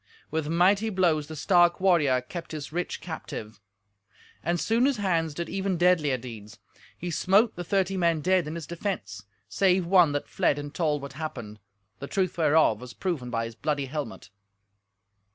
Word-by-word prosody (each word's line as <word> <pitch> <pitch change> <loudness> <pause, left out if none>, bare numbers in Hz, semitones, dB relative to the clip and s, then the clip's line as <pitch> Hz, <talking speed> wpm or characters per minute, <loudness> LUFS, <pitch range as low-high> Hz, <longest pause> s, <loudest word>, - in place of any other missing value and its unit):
With 160 -2 -1
mighty 190 +7 +3
blows 170 -7 +1
the 155 - -7
stark 175 +2 +3
warrior 155 -9 +3
kept 165 +6 -8
his 150 -2 -6
rich 175 +1 -3
captive; 115 - -7 0.8
and 170 +2 0
soon 230 +7 +2
his 280 -4 0
hands 165 -6 0
did 170 0 -3
even 190 -1 -2
deadlier 165 -6 +3
deeds. 115 -4 -10 0.4
He 175 0 -5
smote 200 +7 +3
the 175 - -5
thirty 190 +1 0
men 170 -3 +2
dead 185 0 +2
in 155 - -5
his 165 -2 -5
defence, 125 - -5 0.2
save 185 -2 +2
one 175 -3 +5
that 145 - -2
fled 140 - +1
and 145 0 -6
told 150 -4 0
what 140 -1 -7
happened, 120 -8 -6 0.4
the 140 - -6
truth 190 0 -1
whereof 155 -9 +3
was 125 -1 -10
proven 160 -10 -3
by 115 -1 -1
his 115 - -7
bloody 145 +3 -2
helmet. 130 -10 -6
165 Hz, 170 wpm, -27 LUFS, 140-180 Hz, 0.8 s, one